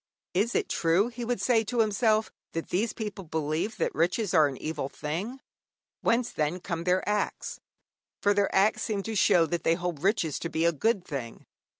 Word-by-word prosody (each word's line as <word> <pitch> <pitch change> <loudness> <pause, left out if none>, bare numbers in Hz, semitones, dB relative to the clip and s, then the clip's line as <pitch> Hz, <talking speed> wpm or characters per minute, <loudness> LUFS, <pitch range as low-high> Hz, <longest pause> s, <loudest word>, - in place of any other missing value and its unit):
Is 210 +6 +1
it - - +1
true, 175 +7 +2
he 240 0 -6
would 240 +1 -1
say 230 -3 +3
to 240 +3 -2
himself, 215 +1 +2 0.2
that 165 - -4
these 215 +5 +1
people 210 -3 -5
believe 160 +6 -2
that - - 0
riches 180 +5 +1
are 155 -4 +6
an 135 -2 -5
evil 150 -2 -3
thing? 175 - -4 0.6
Whence, 235 +1 +2
then, 155 +4 -1
come 170 -2 -4
their 180 +1 +1
acts, 210 0 -1 0.6
for 205 - +3
their 200 -1 +2
acts 200 +3 +3
seem 205 -3 -1
to 225 - -4
show 175 -3 +5
that 170 +1 -2
they 165 - +3
hold 175 -4 -4
riches 180 - +1
to 165 - -4
be 160 +1 0
a 170 - +5
good 195 +4 0
thing? 130 -8 -6
185 Hz, 195 wpm, -28 LUFS, 165-215 Hz, 0.6 s, are